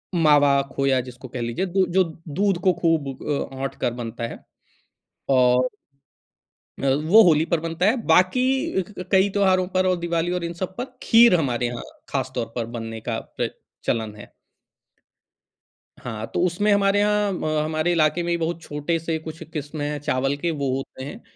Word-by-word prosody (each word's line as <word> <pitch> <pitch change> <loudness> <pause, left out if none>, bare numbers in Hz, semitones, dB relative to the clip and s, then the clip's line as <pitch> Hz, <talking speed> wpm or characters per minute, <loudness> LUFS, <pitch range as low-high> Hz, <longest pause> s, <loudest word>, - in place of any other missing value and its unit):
मावा 145 -4 +5
खोया 135 -1 +1
जिसको 125 +1 -10
कह 125 0 -6
लीजिए 120 +11 -2
द 185 +1 +1
जो 190 0 +5 0.2
दूध 195 +5 +1
को 185 -2 +4
खूब 165 -4 +1 0.2
अ, 140 -2 -2
औंठ 135 +1 -4
कर 120 - 0
बनता 115 -1 -6
है - - -10 0.9
और 125 -1 +4 1.2
अ, - - +2 0.2
वो 215 +7 +7
होली 160 -3 +4
पर 170 - +3
बनता 165 +2 -2
है, 220 +5 +4
बाकी 185 +8 +4 0.4
क 185 - -11
क, 180 - -6
कई 190 +1 +4
त्यौहारों 190 -2 +2
पर 185 0 +2
और 185 - +3
दिवाली 170 0 -1
और 180 -1 -2
इन 170 0 -3
सब 185 +2 -5
पर, 245 - -2 0.2
खीर 230 -4 +6
हमारे 125 -4 0
यहाँ 120 0 -5 0.3
ख़ास 130 -1 -2
तौर 115 - -3
पर 115 -2 -1
बनने 115 0 -6
का - - -3 0.2
प्रच - - -1 0.3
चलन 110 -2 -1
है। 105 - -12 1.7
हाँ, 110 -2 -6
तो - - 0
उसमें 205 +4 +1
हमारे 200 0 +3
यहाँ 210 0 +2
अ, 155 -1 0
हमारे 155 +2 0
इलाके 160 +1 +2
में 170 0 0
बहुत 165 +1 -2
छोटे-से 160 +2 -2
कुछ 160 +1 -9
किस्में 145 0 -4
हैं, 150 -1 -3
चावल 135 0 0
के, 170 +3 -1
वो 140 -3 -2
होते 135 -1 -6
हैं, 170 - -8
160 Hz, 180 wpm, -23 LUFS, 135-185 Hz, 1.7 s, वो